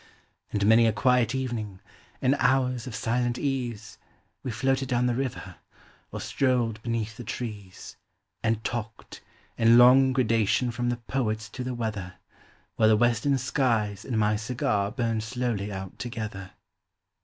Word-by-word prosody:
And 100 -1 0
many 115 +2 +6
a - - +3
quiet 125 +1 +2
evening, 115 -7 -4 0.4
in 130 - +4
hours 125 -2 +1
of 120 - -6
silent 120 +3 0
ease. 120 -6 -3 0.4
We 130 - -5
floated 135 +3 0
down 125 -1 +1
the 125 - +2
river, 120 -8 -4 0.5
or - - -5
strolled 120 -5 0
beneath 115 -1 -3
the 120 - -7
trees, 105 -7 -7 0.4
And 110 -1 0
talked, 115 -2 -5 0.4
in 115 +1 +6
long 130 +2 +7
gradation 120 -1 +1
from 120 +1 -2
the 120 - -1
poets 110 -3 -2
to 125 - -6
the 125 0 -3
weather, 105 -6 -4 0.6
While 110 -1 +5
the 110 - +5
western 120 +4 +2
skies 115 -6 0
and 120 - -3
my 105 0 +2
cigar 105 -3 -1
burned 115 -1 -1
slowly 110 -3 -2
out 95 -1 -7
together. 110 -5 -5
115 Hz, 145 wpm, -27 LUFS, 110-125 Hz, 0.6 s, long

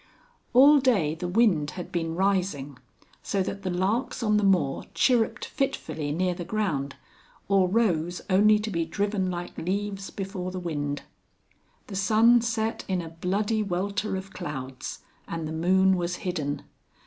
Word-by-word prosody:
All 280 +4 +8
day 210 - +2
the 175 +2 -4
wind 180 -7 +3
had 180 - -6
been 165 -1 -2
rising, 180 -8 0 0.4
so 195 -1 0
that 200 +2 -5
the 190 - -3
larks 205 +8 -1
on 210 -1 +3
the 210 - +1
moor 175 -9 +2
chirruped 240 -4 +2
fitfully 160 - -2
near 180 +4 0
the 175 0 -6
ground, 170 -8 -2 0.5
or 195 -2 +3
rose 180 -5 +1
only 210 +2 +5
to 210 +1 -4
be 170 -2 0
driven 200 +3 -1
like 175 -1 -5
leaves 195 +2 -3
before 190 -2 -5
the 185 0 -5
wind. 145 -4 -3 0.8
The 200 - -8
sun 225 +5 +5
set 225 -1 -1
in 185 -1 0
a 165 -2 -5
bloody 200 +6 -1
welter 200 +1 -2
of 190 +1 -6
clouds, 135 -6 -6 0.2
and 165 -2 -4
the - - -5
moon 190 +4 +3
was 175 0 -2
hidden. 145 -6 -2
185 Hz, 155 wpm, -26 LUFS, 165-210 Hz, 0.8 s, All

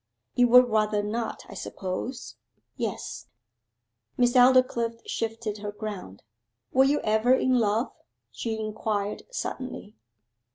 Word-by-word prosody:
'You 245 0 +4
would 250 +1 +7
rather 215 -2 +1
not, 225 +2 -3
I - - -10
suppose?' 185 - -5 0.4
'Yes.' - - -4 0.9
Miss 245 -1 +3
Aldclyffe 245 -2 +4
shifted 225 -2 -3
her 205 0 -4
ground. 205 - -7 0.5
'Were 265 +1 +6
you 290 +2 +2
ever 220 +4 +3
in 255 -1 +2
love?' 220 +2 +1 0.4
she 225 -2 -4
inquired 215 -1 -2
suddenly. 255 - -5
225 Hz, 115 wpm, -27 LUFS, 210-245 Hz, 0.9 s, would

